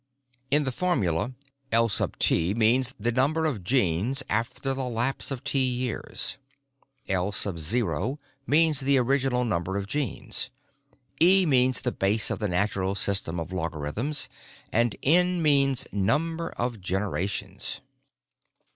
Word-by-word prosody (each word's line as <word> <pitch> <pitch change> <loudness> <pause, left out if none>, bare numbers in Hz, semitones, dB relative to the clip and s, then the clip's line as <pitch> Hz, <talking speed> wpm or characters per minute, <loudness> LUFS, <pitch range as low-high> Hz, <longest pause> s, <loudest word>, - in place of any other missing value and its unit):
In 150 +2 +3
the 130 - -2
formula 120 - 0 0.4
L_{T} 105 -5 +2
means 125 +4 +3
the 120 +3 0
number 145 +6 +1
of 125 - -2
genes 120 - 0
after 115 +5 -1
the 135 -1 -3
lapse 120 +3 -1
of 135 -2 -5
T 140 0 +1
years, 125 0 -2 0.7
L_{O} 95 - 0 0.3
means 155 -1 +4
the 140 0 +3
original 130 -1 +1
number 95 -3 -1
of 100 - -3
genes, 135 +2 -3 0.7
e 185 +2 +7
means 130 -4 +2
the - - -1
base 105 +3 +1
of - - -2
the 105 - -1
natural 95 +1 0
system 95 -4 +1
of 80 +2 -6
logarithms 90 - -2 0.5
and 115 -1 +2
N 180 +4 +4
means 140 -4 +3
number 160 - 0
of 120 -3 -4
generations." 95 +1 -3
120 Hz, 120 wpm, -26 LUFS, 100-135 Hz, 0.7 s, e